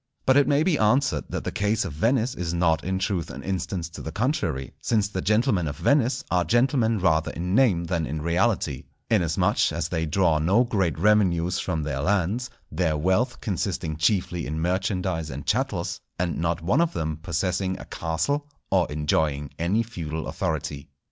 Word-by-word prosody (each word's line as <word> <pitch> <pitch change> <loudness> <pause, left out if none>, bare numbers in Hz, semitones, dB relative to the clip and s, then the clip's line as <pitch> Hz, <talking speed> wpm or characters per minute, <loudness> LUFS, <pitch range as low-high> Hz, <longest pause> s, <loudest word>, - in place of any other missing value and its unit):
But 130 - +5
it 140 0 +5
may 145 +1 +3
be 160 -4 +2
answered 125 +6 +2
that - - -3
the - - -3
case 105 +1 0
of 90 - -5
Venice 115 - +1
is 85 -1 -3
not 80 -2 +2
in 95 +1 -1
truth 95 -3 -1
an - - -8
instance 90 -2 -3
to 85 - -9
the 80 - -5
contrary; 85 - -1
since 105 -3 +1
the 95 -2 -4
gentlemen 105 - +2
of 70 -1 -5
Venice 130 - +2
are 90 0 +3
gentlemen 120 0 +2
rather 80 -4 +2
in 90 +2 -3
name 105 -8 +4
than 85 -2 -1
in 75 - -3
reality, 85 - 0 0.3
inasmuch 85 -8 +2
as - - -2
they 80 0 -1
draw 80 -1 +2
no 95 +10 +4
great 95 - 0
revenues 90 -2 +2
from 80 -5 -2
lands, 90 - 0 0.2
their 80 -1 0
wealth 95 - +1
consisting 90 -6 -2
chiefly 90 +1 0
in 80 +2 -3
merchandise 90 -2 -1
and 70 +1 -6
chattels, - - -1 0.2
and 85 -1 -1
not 85 0 -1
one 120 - +3
of 170 0 +1
them 80 -1 -2
possessing 90 +3 -1
a - - -9
castle 140 - -2 0.2
or 90 -5 +2
enjoying 75 -1 0
any 95 +7 +1
feudal 80 -8 -5
authority. 75 -3 -3
90 Hz, 175 wpm, -25 LUFS, 80-110 Hz, 0.3 s, But